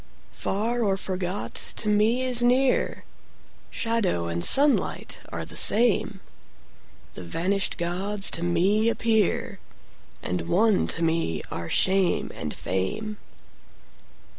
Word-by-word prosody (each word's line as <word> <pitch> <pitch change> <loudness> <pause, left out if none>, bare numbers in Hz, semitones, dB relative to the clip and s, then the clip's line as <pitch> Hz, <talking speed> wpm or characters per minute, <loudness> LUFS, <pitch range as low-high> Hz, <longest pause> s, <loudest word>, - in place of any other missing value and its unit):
Far 230 +5 -2
or 195 -2 0
forgot 185 0 -4 0.2
to 215 - -5
me 215 +4 +2
is 250 -2 +2
near; 250 +2 +1 0.7
Shadow 210 - -1
and 85 +1 -3
sunlight 285 +1 +4
are - - -5
the - - -12
same; 210 -3 +4 0.9
The - - -9
vanished 180 - -2
gods 195 +4 -2
to 165 - -1
me 190 +6 +1
appear; 225 -4 0 0.6
And 90 -2 -3
one 210 +2 +2
to 165 - -3
me 160 - -1
are 85 0 -5
shame 190 -1 +1
and - - -5
fame. 150 - -3
195 Hz, 115 wpm, -25 LUFS, 170-225 Hz, 0.9 s, sunlight